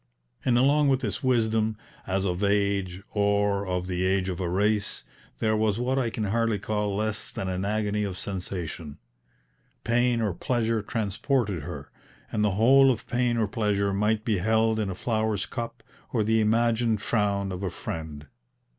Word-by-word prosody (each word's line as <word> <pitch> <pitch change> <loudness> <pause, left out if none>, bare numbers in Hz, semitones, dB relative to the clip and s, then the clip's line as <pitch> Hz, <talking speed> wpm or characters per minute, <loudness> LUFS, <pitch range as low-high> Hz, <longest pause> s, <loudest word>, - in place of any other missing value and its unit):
And 120 -2 +3
along 145 +3 +4
with 135 -1 +2
this 105 -6 -3
wisdom, 110 -3 +1 0.3
as 95 +1 0
of 90 +1 -1
age 100 -2 0
or 100 -1 +1
of 90 -1 -1
the 90 0 -2
age 95 0 +1
of 90 -1 -4
a 90 -2 -1
race, 105 +3 0 0.3
there 110 -1 +1
was 110 -1 +1
what 130 +3 0
I 120 -3 0
can 110 - -3
hardly 115 +1 +1
call 105 0 -2
less 105 0 -2
than 95 - -4
an 95 0 -2
agony 105 0 0
of 95 -3 -3
sensation. 90 -6 -5 0.9
Pain 120 0 +2
or 105 -5 0
pleasure 115 +2 0
transported 105 - -1
her, 70 - -8 0.4
and 105 - 0
the 105 -2 +2
whole 135 +4 +6
of 120 -4 -1
pain 120 -1 0
or 110 -2 +1
pleasure 100 -2 0
might 105 +2 +1
be 105 -5 +1
held 110 +2 +2
in 105 -2 -1
a 95 - -4
flower's 110 -1 -1
cup 115 0 -6 0.3
or 115 -3 +1
the 110 +1 +2
imagined 115 0 +2
frown 100 -3 0
of 90 0 -5
a 95 - -1
friend. 80 -3 -6
105 Hz, 175 wpm, -26 LUFS, 100-115 Hz, 0.9 s, whole